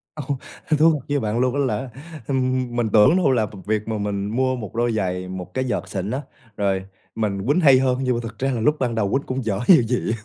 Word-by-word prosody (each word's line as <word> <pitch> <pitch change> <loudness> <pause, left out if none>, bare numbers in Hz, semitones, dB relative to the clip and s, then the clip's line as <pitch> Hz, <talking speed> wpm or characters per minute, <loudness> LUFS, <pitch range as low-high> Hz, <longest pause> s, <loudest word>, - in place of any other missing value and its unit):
Ồ, 150 - -5 0.5
thú 160 +2 +6
thật 150 - -2
với 145 0 +1
bạn 110 +1 -1
luôn 125 0 +2
á - - 0
là, 135 -1 -1 0.4
ừm, 130 -2 0
mình 120 -2 0
tưởng 110 +10 +6
đâu 175 -8 +3
là 115 -4 +2
v 105 - -11
việc 105 0 -1
mà 110 -1 -2
mình 100 -1 -2
mua 130 +3 +1
1 105 -5 -7
đôi 120 +1 +1
giày, 90 -4 -2
1 90 -1 -7
cái 130 - -1
vợt 125 - -2
xịn 95 +1 -3
á, 130 +3 -2 0.4
rồi 95 -2 0 0.3
mình 100 -3 -2
quýnh 145 +5 +3
hay 135 -6 +6
hơn, 130 -1 +1
nhưng 130 -2 +1
mà - - -1
thực 115 -2 -8
ra 135 +1 0
là 120 -3 -2
lúc 150 +7 +3
ban 120 -3 -1
đầu 105 -3 0
quýnh 140 - +1
cũng 130 -1 -3
dở 100 -3 -1
như 170 -8 +8
gì. 120 0 -1
120 Hz, 260 wpm, -22 LUFS, 105-130 Hz, 0.5 s, như